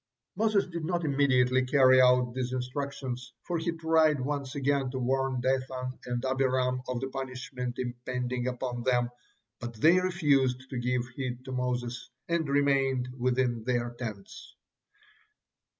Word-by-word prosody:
'" - - -60
Moses 215 0 +2
did 170 -2 -6
not 175 0 -1
immediately 130 -3 +3
carry 130 -1 +6
out 125 -1 +4
these 125 0 -2
instructions, 125 -1 -4
for 175 -2 -2
he 170 +1 -1
tried 160 -2 +3
once 140 0 -3
again 140 -1 +1
to 130 - -4
warn 130 0 0
Dathan 130 0 -2
and 120 +1 -2
Abiram 130 -1 +1
of 125 -1 -2
the 135 - -3
punishment 130 -2 -5
impending 125 0 -3
upon 125 -1 -3
them, 120 -1 +1 0.5
but 120 -1 -6
they 160 +11 +5
refused 140 -8 +1
to 130 - -2
give 125 0 0
heed 125 0 -5
to 130 - -6
Moses, 125 -1 -2 0.2
and 170 -3 0
remained 135 -3 +2
within 125 -2 0
their 120 0 0
tents. 110 -5 -8
130 Hz, 145 wpm, -29 LUFS, 125-140 Hz, 0.5 s, carry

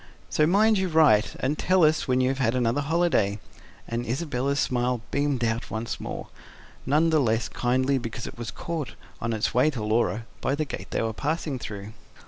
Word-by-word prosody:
So 150 - +3
mind 210 +4 +4
you 190 - +1
write 155 -10 +4
and 145 +4 0
tell 185 -1 +3
us 155 0 +3
when 130 0 +2
you 130 +1 +2
have 130 -3 0
another 125 +2 +1
holiday" 150 - +1 0.5
and 115 +1 -2
Isabella's 135 +2 -1
smile 125 -2 0
beamed 140 -4 0
out 115 +1 -1
once 110 +1 -4
more, - - -6 0.6
none 155 +4 +3
the 155 - +4
less 115 -3 +1
kindly 130 +2 +1
because 115 -1 -5
it - - -7
was 120 -2 -5
caught, 165 -4 -5 0.3
on 115 - -1
its 110 -2 -1
way 130 +5 +4
to 125 -8 -4
Laura, 110 +1 0 0.2
by 135 - 0
the 155 +1 -1
gate - - -7
they - - -1
were 110 0 -1
passing 150 +1 -2
through. 105 -1 -7
130 Hz, 190 wpm, -26 LUFS, 115-155 Hz, 0.6 s, mind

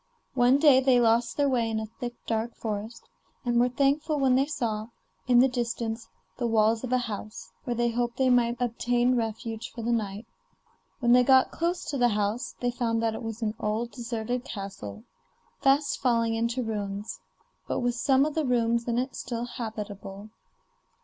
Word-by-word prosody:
One 250 +1 +4
day 285 -3 +6
they 260 -2 +4
lost 235 0 +2
their 285 -1 +3
way 240 -4 +1
in 220 -1 -1
a 220 - -3
thick, 240 +2 -7
dark 225 +1 -2
forest, 220 +1 -5 0.4
and 240 -1 +2
were 245 +1 +4
thankful 285 +4 +1
when 265 -2 +3
they 270 +2 +3
saw, 225 -7 -2 0.4
in 245 -1 +5
the 265 - +6
distance, 235 -2 -3 0.3
the 240 - 0
walls 225 0 +2
of 255 - -4
a 255 - +4
house, 215 -3 -6
where 245 - -1
they 235 0 +1
hoped 240 0 -2
they 260 -1 +3
might 240 -1 +2
obtain 245 +1 +1
refuge 225 0 -3
for 230 - -7
the 235 - 0
night. 210 -1 -2 0.8
When 240 -1 +3
they 250 +1 +7
got 260 0 +5
close 345 +2 -2
to 280 - -3
the 245 - +5
house 210 +4 -2
they 245 0 +1
found 230 -2 -1
that 225 -1 +1
it - - -6
was 225 0 -5
an 215 -1 0
old 220 +3 -2
deserted 240 0 -3
castle, 115 - -7 0.6
fast 275 +2 +2
falling 230 -3 +2
into 235 +2 -1
ruins, 205 -2 -4 0.5
but - - -1
with 245 0 +1
some 265 +3 +3
of 305 - -2
the 315 - 0
rooms 235 -1 +1
in 235 0 0
it 255 +1 -2
still 235 -1 -4
habitable. 210 -3 -7
235 Hz, 185 wpm, -27 LUFS, 225-250 Hz, 0.8 s, they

